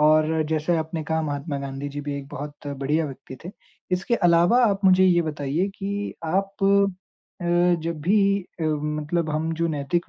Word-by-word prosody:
और 155 +1 +4
जैसे 160 +2 +1
आपने 160 0 -3
कहा 160 +1 0
महात्मा 145 0 -3
गांधी 140 +1 -5
जी 145 +1 -5
भी 145 0 -4
एक 140 -1 -7
बहुत 145 +1 -8
बढ़िया 145 +3 -1
व्यक्ति 135 -1 -9
थे। 180 - -6 0.4
इसके 190 +6 +1
अलावा 175 +7 +5
आप 200 -2 +1
मुझे 185 0 +6
ये 175 -2 +4
बताइए 155 +4 -1
कि 200 +1 -3
आप 195 +4 -1 0.8
अ, - - -4 0.4
जब 165 -2 -3
भी 195 +6 +3 0.4
अ, - - -1
मतलब 150 +2 -1
हम 160 +2 -1
जो 170 - +3
नैतिक 155 +3 -1
160 Hz, 175 wpm, -24 LUFS, 145-175 Hz, 0.8 s, मुझे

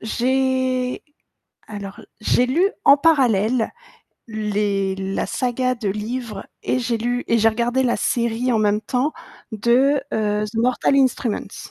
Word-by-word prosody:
j'ai 255 +2 0 0.7
alors, 200 -2 -8 0.2
j'ai 245 +3 +2
lu 340 +10 +2 0.2
en 280 - +8
parallèle 250 -7 +2 0.6
les 205 -3 -1
la 195 0 -3
saga 255 0 -1
de 230 -4 -4
livres 215 +1 -4 0.2
et 255 - 0
j'ai 240 -2 -1
lu 245 +2 -2
et 230 - +3
j'ai 225 0 +5
regardé 240 +3 0
la 245 -2 +1
série 235 +1 0
en 225 - +2
même 210 0 +2
temps 255 +6 -1 0.4
de, 250 +6 +3
heu, 210 -1 0
The 210 - -11
Mortal 250 +4 +2
Instruments. 260 -4 -1
235 Hz, 140 wpm, -21 LUFS, 215-255 Hz, 0.7 s, en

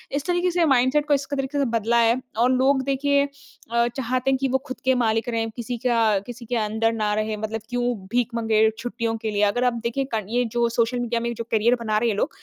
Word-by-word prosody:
इस 285 - -2
तरीके 355 0 +1
से 340 -1 +2
माइंडसेट 270 +2 +3
को 290 - +3
इस 275 -1 +1
क - - 0
तरीके 270 +2 -2
से 275 - +2
बदला 230 0 +1
है 235 +2 +3 0.2
और 245 +2 +3
लोग 265 +1 +3
देखिए 280 +1 +2
अ, 280 -5 -3
चाहते 255 +1 -2
हैं 265 - +2
कि 270 0 0
वो 265 +1 +2
खुद 260 - -6
के 260 -1 +4
मालिक 225 -1 +1
रहे, 225 -1 0
किसी 240 0 -4
का 225 -4 +3
किसी 245 -1 -8
के 245 +2 -3
अंडर 220 +1 +1
ना 210 -2 0
रहे, 215 0 -1
मतलब 215 +1 -4
क्यों 245 0 -1 0.3
भीख 245 -1 +2
माँगे 220 -1 +3
छुट्टियों 230 -1 -3
के 220 -1 -4
लिए 205 0 +1
अगर 210 +5 +2
आप 250 -1 +2
देखें 270 +3 -2
क 215 -3 -2
ये 245 +1 +1
जो 235 0 +1
सोशल 235 +1 0
मीडिया 235 -1 -1
में 235 0 -2
जो 230 - -4
करियर 230 +3 +3
बना 215 -2 0
रहे 230 +1 +1
हैं - - +1
ये - - -6
लोग, 295 - +1
240 Hz, 255 wpm, -23 LUFS, 225-260 Hz, 0.3 s, के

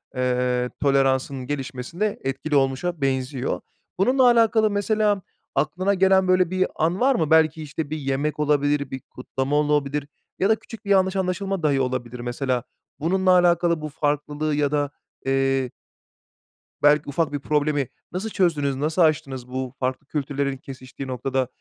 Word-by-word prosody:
eee, 125 -1 0
toleransının 135 -1 +1
gelişmesinde 145 +8 -3
etkili 135 +3 -2
olmuşa 140 +5 0
benziyor. 130 -1 -1 0.4
Bununla 255 +6 +4
alakalı, 225 -3 +5
mesela, 205 -1 +1 0.3
aklına 175 +8 +1
gelen, 190 0 +4
böyle, 185 -2 +3
bir 185 0 +1
an 170 +4 0
var 265 +1 +4
mı? 160 -6 0
Belki, 160 0 +4
işte, 155 0 -5
bir 155 - -3
yemek 145 +2 -2
olabilir, 145 -1 +1
bir 130 - -4
kutlama 135 +2 -3
olabilir 150 -1 +1 0.3
ya 195 - +2
da 220 - +5
küçük 225 0 -12
bir - - -6
yanlış 190 0 +3
anlaşılma 190 -1 -1
dahi 140 -3 +2
olabilir 125 -1 -3
mesela. 125 0 -2 0.4
Bununla 185 +4 +2
alakalı, 175 -2 +3
bu 155 - -4
farklılığı 150 +1 -1
ya 145 -1 +1
da, 145 -1 0 0.3
eee 135 -1 +1 1.1
belki 145 0 +4
ufak 145 +1 0
bir 145 - -1
problemi, 145 -2 0 0.2
nasıl 195 +5 -3
çözdünüz, 150 -9 +1
nasıl 155 +5 0
aştınız 140 -6 +1
bu 130 0 -4
farklı 130 +2 -2
kültürlerin 140 -2 -2
kesiştiği 130 0 -9
noktada, 130 0 -1
145 Hz, 145 wpm, -23 LUFS, 135-180 Hz, 1.1 s, alakalı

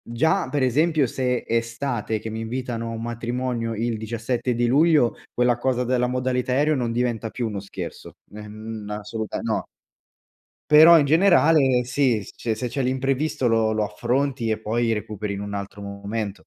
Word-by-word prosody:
già, 160 +10 0
per 145 -2 -1
esempio, 150 +2 +2
se 125 0 -1
è - - -7
estate 115 -2 -2
che 110 - -6
mi 110 - -5
invitano 115 0 -4
a - - -5
un 115 - -5
matrimonio 120 0 -3
il 115 +1 -1
17 115 +2 -2
di 120 +1 +1
luglio, 150 -2 +4 0.2
quella 125 -1 +2
cosa 125 0 0
della 125 0 +1
modalità 125 0 -1
aereo 150 +3 +2
non 120 -2 -1
diventa 120 -2 -1
più 120 -1 -3
uno 105 - -4
scherzo. 100 0 -8 0.2
Ehm, 105 +1 -8
n 105 - -8
assoluta 105 +1 -4
no. 110 -1 -1 1.1
Però, 160 +2 +9
in 145 - +3
generale, 155 -6 +4
sì. 125 -3 +1
Se - - -12 0.2
c 110 - -2
se 125 +2 -3
c'è 130 +4 -4
l'imprevisto 135 +1 0
lo 110 -1 +2
lo 110 -1 0
affronti 125 +3 -1
e 110 - 0
poi 115 +2 0
recuperi 105 -1 -4
in 100 - -5
un 100 - -6
altro 100 0 -6
momento. 100 +1 -5
120 Hz, 180 wpm, -23 LUFS, 110-130 Hz, 1.1 s, Però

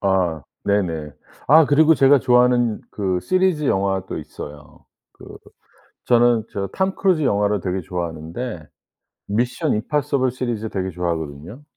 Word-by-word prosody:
아 90 -6 0 0.2
네네. 85 -7 -1 0.4
아 160 +3 +7
그리고 155 +2 +5
제가 135 0 +5
좋아하는 125 -2 +3
그 95 -3 -1
시리즈 185 - +1
영화도 95 -2 -1
있어요. 75 -1 -11 0.3
그 - - -13 0.7
저는 120 -2 +3
저 100 -1 -3
톰 190 - -1
크루즈 185 -5 +1
영화를 105 -4 +1
되게 95 +1 -2
좋아하는데 85 +2 -5 0.6
미션 120 +3 0
임파서블 140 +3 0
시리즈 120 -3 -3
되게 95 -1 -3
좋아하거든요. 85 - -5
105 Hz, 295 characters per minute, -21 LUFS, 90-130 Hz, 0.7 s, 아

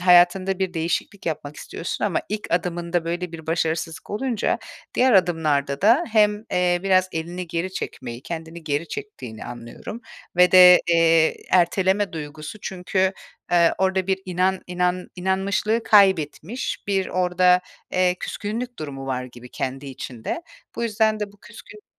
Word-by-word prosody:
hayatında 180 +1 +5
bir 185 -2 -2
değişiklik 170 +4 -2
yapmak 150 -2 -4
istiyorsun 170 - -5
ama 195 -5 +1
ilk 210 +1 -3
adımında 175 0 -1
böyle 175 +1 -3
bir 160 -1 -9
başarısızlık 165 +1 -2
olunca 230 +1 -1 0.4
diğer 255 0 +4
adımlarda 155 -7 +2
da 235 - +5
hem, 210 -1 +3
eee, 180 -1 +2
biraz 185 -1 +3
elini 175 +2 -4
geri 170 +3 -3
çekmeyi, 120 -6 -6
kendini 165 0 -7
geri 150 +2 -2
çektiğini 125 - -7
anlıyorum 120 - -8 0.4
ve 180 0 +5
de, 180 -1 +9
eee, 165 -1 +4
erteleme 190 +2 +2
duygusu 155 +4 -7
çünkü 190 0 -1 0.4
eee, 170 -1 +5
orada 190 -1 +1
bir 190 0 +1
inan 185 +1 0
inan 180 0 -1
inanmışlığı 195 +4 0
kaybetmiş, 195 - +2
bir 195 -2 +1
orada, 180 0 +3 0.3
eee, 180 -1 +3
küskünlük 235 +4 -4
durumu 135 -3 -6
var 130 -1 -2
gibi 125 0 -12
kendi 135 +3 -4
içinde. 130 - -6 0.3
Bu - - -3
yüzden 220 -1 +1
de 205 -1 -4
bu 205 - -22
küskünlük 410 - -14
180 Hz, 140 wpm, -23 LUFS, 160-195 Hz, 0.4 s, de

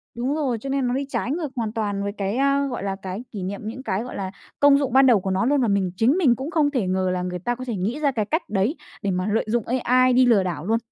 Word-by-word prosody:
Đúng 255 +5 -1
rồi, 265 -7 -1
cho 275 - -5
nên 270 -2 0
nó 245 - 0
đi 275 +2 -1
trái 260 - -2
ngược 310 -3 -3
hoàn 225 -3 -2
toàn 205 -3 -2
với 200 - -2
cái 200 +2 -3
à, 275 +1 +2
gọi 245 -6 -4
là, 195 -1 -2
cái 190 +5 -5
kỷ 200 -4 -5
niệm, 195 +2 -4
những 255 +4 -6
cái, 205 -2 -1
gọi 250 - -8
là, 190 -1 -4 0.3
công 285 -1 +6
dụng 275 -4 -1
ban 265 0 +6
đầu 240 -5 +5
của 190 0 -3
nó 190 +4 +1
luôn, 285 +1 +2
và 240 - +2
mình 195 -3 +1
chính 255 - +3
mình 265 -10 +4
cũng 270 +7 -5
không 295 -4 +2
thể 240 -9 -1
ngờ 185 0 0
là 180 - -2
người 180 0 -4
ta 240 +7 -2
có 255 - -7
thể 240 -3 -3
nghĩ 210 +10 -2
ra 290 -2 +2
cái 220 -5 -1
cách 315 - -2
đấy 210 - 0 0.3
để 200 - -1
mà 185 +2 -1
lợi 225 - +1
dụng 230 0 0 0.2
AI 255 +1 +4
đi 255 +1 +5
lừa 225 -6 +4
đảo 170 -4 -4
luôn. 225 +3 +2
235 Hz, 310 wpm, -23 LUFS, 195-270 Hz, 0.3 s, công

